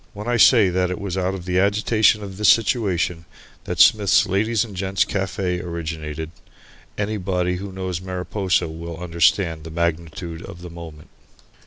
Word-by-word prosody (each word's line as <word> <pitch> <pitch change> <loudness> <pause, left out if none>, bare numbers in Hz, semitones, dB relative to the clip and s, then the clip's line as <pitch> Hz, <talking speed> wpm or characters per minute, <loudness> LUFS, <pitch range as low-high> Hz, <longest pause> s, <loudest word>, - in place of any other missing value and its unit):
When 105 +2 -8
I 120 0 +1
say 110 -3 +6
that 90 0 0
it 90 - -4
was 100 -3 -4
out 95 0 -1
of 90 -2 -8
the 90 0 +1
agitation 105 +2 +3
of 95 -2 -8
this 105 - +4
situation 95 -7 +1 0.4
that - - -4
Smith's 105 -2 +5
Ladies' 105 +3 +1
and 105 -4 -11
Gent's 95 0 0
Cafe 95 -1 -2
originated, 80 -2 -5 0.7
anybody 95 -4 -1
who 100 +1 -7
knows 95 -2 -4
Mariposa 90 -1 -1
will 85 +1 -7
understand 85 -1 +1
the 80 - -8
magnitude 85 +1 -3
of 85 0 -10
the 90 - -8
moment. 80 -3 -11
90 Hz, 160 wpm, -22 LUFS, 85-100 Hz, 0.7 s, say